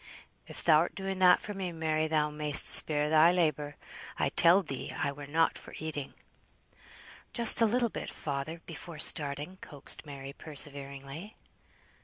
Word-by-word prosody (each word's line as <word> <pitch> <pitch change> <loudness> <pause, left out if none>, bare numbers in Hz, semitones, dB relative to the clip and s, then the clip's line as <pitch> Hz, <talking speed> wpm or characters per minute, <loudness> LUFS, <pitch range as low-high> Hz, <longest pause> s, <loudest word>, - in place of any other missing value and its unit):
"If - - -11
thou'rt 160 +1 +2
doing 195 -1 -5
that 180 -1 +4
for 210 - -7
me, 190 -3 -5
Mary, 160 -1 -2
thou 150 -1 -1
may'st 150 -1 +1
spare 150 -1 +5
thy 155 +2 +4
labour. 150 -4 -2 0.4
I - - -1
telled 175 +3 +4
thee 135 -3 -6
I 140 0 -3
were 140 0 -11
not 160 +3 0
for - - -12
eating." 150 -3 -7 1.2
"Just 235 0 +6
a 230 - +4
little 240 +2 0
bit, - - -7
father, 150 +2 -6
before 165 0 -10
starting," 150 +3 +2
coaxed 145 -6 -4
Mary, 140 -2 -10
perseveringly. 140 +4 -4
155 Hz, 150 wpm, -29 LUFS, 145-175 Hz, 1.2 s, Just